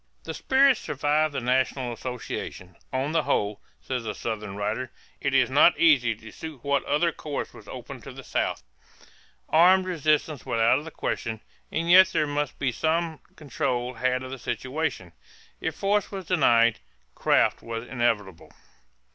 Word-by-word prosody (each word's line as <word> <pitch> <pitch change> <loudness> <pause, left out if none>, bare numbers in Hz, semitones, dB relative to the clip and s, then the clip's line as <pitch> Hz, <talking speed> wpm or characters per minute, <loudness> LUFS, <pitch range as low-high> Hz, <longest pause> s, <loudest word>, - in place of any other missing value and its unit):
The - - -5
spirit 270 -1 +4
survived 150 +1 0
the - - 0
national 125 0 0
association. 115 -7 -6 0.2
"On 130 +3 -1
the 165 0 +2
whole," 105 -7 -1 0.2
says 125 -2 -4
a 110 -2 -4
Southern 105 -3 -4
writer, 110 +5 -2 0.3
"it 140 -1 -1
is 130 -2 +5
not 145 +5 +6
easy 130 -9 +4
to 110 0 -13
see 160 - -7
what 140 +1 -1
other 150 +4 +2
course 150 -3 -5
was - - -14
open - - -8
to - - -9
the - - -10
South.... - - -2 0.9
Armed 185 +3 +5
resistance 155 -5 0
was 115 - -2
out 115 +4 +4
of 150 - -10
the - - -6
question. 110 -7 -3 0.3
And 165 +1 -1
yet 185 +1 +8
there 155 -4 0
must 145 -1 -2
be 135 -2 0
some 160 +4 -1 0.2
control 125 -4 -2
had 130 +1 0
of 130 - -7
the 135 - -6
situation.... 130 - -3 0.5
If - - -3
force 205 +1 0
was 195 -2 -6
denied, 120 -10 +4 0.3
craft - - +2
was 115 +1 -6
inevitable." 110 -8 -1
135 Hz, 165 wpm, -26 LUFS, 115-160 Hz, 0.9 s, yet